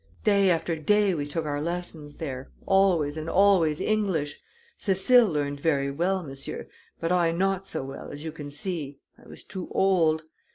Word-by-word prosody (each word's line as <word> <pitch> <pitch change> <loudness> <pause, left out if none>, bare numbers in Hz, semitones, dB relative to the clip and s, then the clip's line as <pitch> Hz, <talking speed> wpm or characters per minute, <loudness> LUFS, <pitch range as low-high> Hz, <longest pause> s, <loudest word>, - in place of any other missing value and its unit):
Day 200 -2 +4
after 165 -1 +1
day 205 +5 +2
we 145 -3 -2
took 155 +2 -3
our 145 -1 -2
lessons 165 -3 -5
there 135 -4 -5 0.2
always 175 -6 +3
and 155 +1 -4
always 185 -6 +4
English. 190 -9 -1 0.4
Cécile 210 +3 +4
learned 145 -2 -2
ver' 140 -3 +1
well, 180 +5 0
monsieur; 135 -3 -6 0.3
but 165 +1 -1
I 175 -2 +3
not 195 +2 0
so - - -4
well, 135 +1 -8
as 145 +1 -8
you 160 - -4
can 150 -2 -8
see 145 -2 -4 0.3
I - - -17
was - - -10
too 185 -2 -6
old. 165 -5 +3
165 Hz, 170 wpm, -26 LUFS, 145-190 Hz, 0.4 s, Day